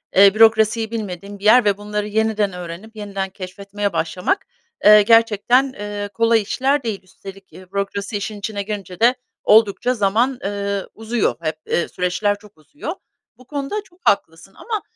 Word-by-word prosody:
eee, 195 0 +7
bürokrasiyi 220 0 +4
bilmediğin 200 -2 -6
bir - - -15
yer 240 +2 +6
ve 200 -1 +2
bunları 210 0 -3
yeniden 215 -2 0
öğrenip, 180 +5 -8
yeniden 200 -2 -4
keşfetmeye 200 +1 -5
başlamak, 180 - -1 0.4
eee, 210 0 +9
gerçekten, 230 +4 +3
eee, 205 0 -5
kolay 230 0 +3
işler 270 +6 0
değil. 210 -4 -4
Üstelik, 195 +1 -13
eee, 185 0 -14
bürokrasi 200 +1 -3
işin 205 +1 -5
içine 200 -1 -4
girince 195 -3 -6
de 245 +3 +5 0.3
oldukça 220 +3 +4
zaman, 235 +5 +1
eee, 200 0 -2
uzuyor 225 0 -1
hep, 155 -1 -2
eee, 175 - 0
süreçler 205 +3 -1
çok 210 -4 -18
uzuyor. 295 - -7 0.4
Bu 255 - -18
konuda 295 +9 -4
çok 360 -2 -25
haklısın 195 -1 -2
ama, 440 -3 -4
205 Hz, 155 wpm, -20 LUFS, 195-225 Hz, 0.4 s, eee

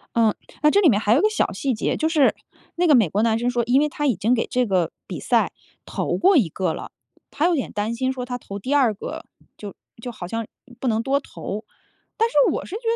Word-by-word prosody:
嗯， 225 -2 +4 0.3
那 300 - +5
这 405 - +4
里 345 - +6
面 210 -4 +3
还 215 0 +2
有 265 - +4
一 - - +2
个 430 - +4
小 430 - 0
细 270 -3 -1
节， 215 - -1
就 315 +1 0
是 300 -5 +3 0.4
那 355 +1 +1
个 295 - +6
美 220 -7 +4
国 210 +6 0
男 225 -1 +2
生 240 +1 0
说， 240 -1 0
因 250 +3 +4
为 300 - +2
他 295 0 -2
已 245 - +2
经 215 +7 +1
给 230 - +1
这 250 0 +1
个 185 -6 0 0.2
比 - - -6
赛 - - +1 0.3
投 - - -2
过 380 +1 +4
一 195 -11 +3
个 180 0 -2
了。 - - -8 0.4
他 310 - +1
有 355 - +2
点 270 - -3
担 215 +3 -2
心 260 +2 0
说 255 -1 -5
他 245 0 -4
投 200 -4 -8
第 265 +8 -1
2 255 -6 +4
个 205 - -7 0.3
就 205 -2 -8 0.3
就 245 +1 -5
好 175 -6 -8
像 225 +3 -3 0.4
不 260 - -1
能 220 0 +1
多 270 +4 +1
投。 210 -4 -7 0.5
但 455 - +3
是 - - -14 0.2
我 - - -3
是 375 - -7
觉 445 - -5
245 Hz, 275 characters per minute, -22 LUFS, 215-290 Hz, 0.5 s, 里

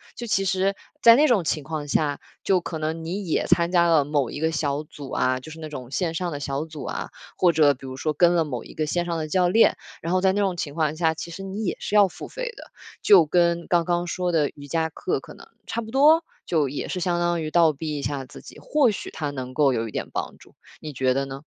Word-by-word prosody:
就 240 - -6
其 195 -3 +1
实 190 +1 +1 0.3
在 230 0 +9
那 300 +4 +5
种 230 - +3
情 155 -2 -1
况 150 0 -5
下， 145 0 0 0.2
就 190 -2 +3
可 165 -2 -6
能 160 +1 -3
你 190 +5 -3
也 160 - 0
参 170 -1 +3
加 170 -1 +4
了 160 -3 +4
某 145 -3 0
一 - - -6
个 160 +1 +1
小 150 -2 -1
组 145 -3 -10
啊， 130 0 +1
就 145 +5 -11
是 160 - -10
那 155 - -7
种 130 -5 -8
线 165 +1 -1
上 175 +1 -2
的 145 - -4
小 140 +1 -3
组 155 -2 -9
啊， - - -4 0.3
或 180 - +4
者 150 -2 +5
比 135 - -13
如 130 - -6
说 155 +4 -1
跟 175 +3 +4
了 170 -2 +3
某 125 -7 -5
一 - - -13
个 155 - -1
线 175 +2 -1
上 170 -1 -2
的 155 -1 -3
教 180 +2 +2
练， 225 +6 +4 0.2
然 165 - -3
后 185 - +3
在 190 0 +3
那 205 - 0
种 190 -3 0
情 145 -3 -4
况 155 -1 0
下， 160 -2 +2
其 160 +1 -7
实 195 +4 -7
你 195 +3 -5
也 190 - -2
是 210 - -3
要 205 -1 +7
付 - - -9
费 - - -5
的。 - - -12 0.3
就 185 -5 +7
跟 170 +1 +2
刚 170 -2 +2
刚 175 0 0
说 180 +1 -1
的 155 -4 +2
瑜 145 -1 -11
伽 160 +3 0
课 160 - -2
可 - - -12
能 - - -15 0.2
差 235 - -2
不 220 -1 -9
多， 305 +5 +5 0.2
就 155 -4 +2
也 140 +2 -4
是 185 - -3
相 175 0 0
当 175 -1 0
于 155 - -3
倒 165 -2 +5
逼 150 0 -4
一 - - -5
下 140 -1 -3
自 - - -13
己， - - -13
或 290 -4 +2
许 205 - -6
它 150 -2 -3
能 130 -2 -6
够 145 -1 +3
有 115 -2 -1
一 - - -8
点 - - -4
帮 - - -4
助。 - - -19 0.3
你 155 - -6
觉 130 -1 +1
得 135 +1 -1
呢？ 135 +1 -8
160 Hz, 290 characters per minute, -24 LUFS, 145-180 Hz, 0.3 s, 在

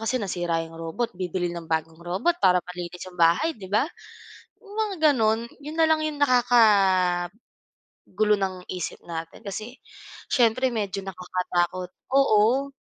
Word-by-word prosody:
kasi 225 +3 -1
nasira 175 -6 -1
'yong 165 - -13
robot, 165 +9 -3
bibili 180 -1 -3
ng 170 -2 -8
bagong 160 0 -2
robot 195 - -1
para 180 -1 +5 0.2
malinis 175 0 -7
'yong 180 -2 -10
bahay, 170 - +4
'di 195 -7 -11
ba? 210 +7 +2 0.8
'Yong 410 -1 -13
mga 420 -3 -1
gano'n, 225 -2 +1
'yon 300 +2 -8
na 325 - +2
lang 315 - +4
'yong 295 -1 -3
nakakagulo 210 -3 +2
ng 185 -2 -3
isip 180 -3 -5
natin, 165 +4 -7
kasi 215 +4 -6 0.6
siyempre 255 +1 +3
medyo 200 -3 -2
nakakatakot, 180 -1 -2 0.2
oo. 270 +1 +4
195 Hz, 140 wpm, -25 LUFS, 175-245 Hz, 0.8 s, para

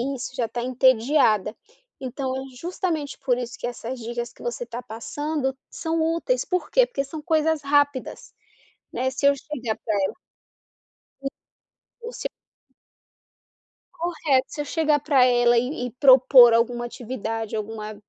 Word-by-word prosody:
isso. 255 0 -6
Já 240 -3 -1
tá 240 - -4
entediada. 255 -3 +3 0.4
Então, 260 0 -4
é 265 - -3 0.2
justamente, 330 -4 -3
por 255 -3 +1
isso 245 0 -5
que - - -5
essas 245 +1 -6
dicas 240 +1 -5
que - - -18
você 240 0 -3
tá 240 +1 -6
passando, 265 +4 -3
são 325 0 -2
úteis. 335 +10 0
Por 365 -2 -2
quê? - - +5
Porque 275 - -3
são 305 +2 -7
coisas 320 -1 +1
rápidas, 285 -1 0 0.6
né. 260 +1 -1
Se 275 +1 0
eu 280 - +6
chegar 255 -6 -4
pra 215 - 0
ela - - -2 1.1
Sim. 275 - -4 0.8
O 470 +1 -6
seu - - -4 1.7
Correto. 310 -6 0
Se 295 - -4
eu 290 - -5
chegar 300 -1 +1
pra 275 -3 +4
ela 240 -1 +4
e, 250 +2 -1
e - - -9
propor 255 -2 +7
alguma 240 +1 +1
atividade, 225 -3 -5
alguma, 215 0 -5
260 Hz, 150 wpm, -24 LUFS, 240-295 Hz, 1.7 s, propor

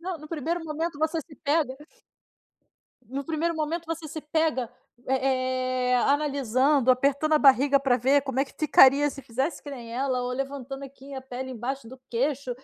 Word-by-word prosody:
Não, 355 0 -4
no 305 +1 -12
primeiro 330 +2 -3
momento 320 0 -3
você 315 +1 0
se 295 0 -15
pega 290 -2 0 1.3
no 275 +3 -4
primeiro 325 +3 -1
momento 320 +2 -3
voce 325 -1 -5
se 315 - -6
pega, 300 -5 0 0.4
eh 255 -1 0
eh, - - +5
analisando, 275 -1 +2
apertando 280 +4 +2
a - - +5
barriga 275 0 +5
pra 265 -3 +2
ver 270 +4 +3
como 270 -2 -4
é - - +3
que - - -18
ficaria 290 -2 +6
se 275 - -9
fizesse 265 +5 -3
que 290 - -8
nem 240 -4 -8
ela, 255 0 -1
ou 250 0 -3
levantando, 270 +1 -5
assim, 275 +1 -11
a 265 - -5
pele 260 0 -7
embaixo 255 +1 -5
do 260 +2 -11
queixo. 265 +2 -1
275 Hz, 180 wpm, -26 LUFS, 255-305 Hz, 1.3 s, ficaria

